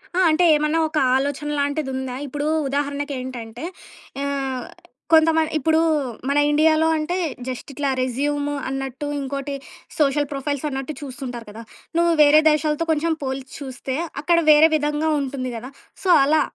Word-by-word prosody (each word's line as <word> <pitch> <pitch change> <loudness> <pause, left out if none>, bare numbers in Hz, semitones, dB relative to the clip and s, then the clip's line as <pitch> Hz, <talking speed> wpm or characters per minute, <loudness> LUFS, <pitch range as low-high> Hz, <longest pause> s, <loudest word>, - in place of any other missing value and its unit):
ఆ! - - +2
అంటే 320 +3 +3
ఏమన్నా 305 +2 +1
ఒక 310 - -3 0.2
ఆలోచన 285 +2 -1
లాంటిదుందా? 265 -3 -2
ఇప్పుడు 290 +2 -3 0.2
ఉదాహరణకేంటంటే 275 -4 -4 0.6
ఆహ్, 270 -3 -2 0.5
కొంతమం 320 0 +5
ఇప్పుడు 315 +2 +2 0.5
మన 280 - +1
ఇండియాలో 315 +1 +4
అంటే, 315 +3 -1 0.3
జస్ట్ 255 +1 -5
ఇట్లా 285 0 -1
రెజ్యూము 290 +3 -1
అన్నట్టు, 270 +1 -4
ఇంకోటి 275 +1 -4 0.5
సోషల్ 290 0 +2
ప్రొఫైల్సన్నట్టు 280 0 -3
చూస్తుంటారు 255 -4 -7
కదా! 220 +2 -9 0.4
నువ్వు 340 0 +3
వేరే 295 +1 +7
దేశాలతో 305 +2 0
కొంచెం 320 +1 +1
పోల్చి 265 0 -4
చూస్తే, 265 -1 -5 0.3
అక్కడ 340 +3 +3
వేరే 305 +2 +7
విధంగా 300 +1 0
ఉంటుంది 260 -2 -4
కదా! 250 +4 -8 0.3
సో, 380 - -1 0.2
అలా 305 +2 +3
285 Hz, 130 wpm, -22 LUFS, 265-305 Hz, 0.6 s, వేరే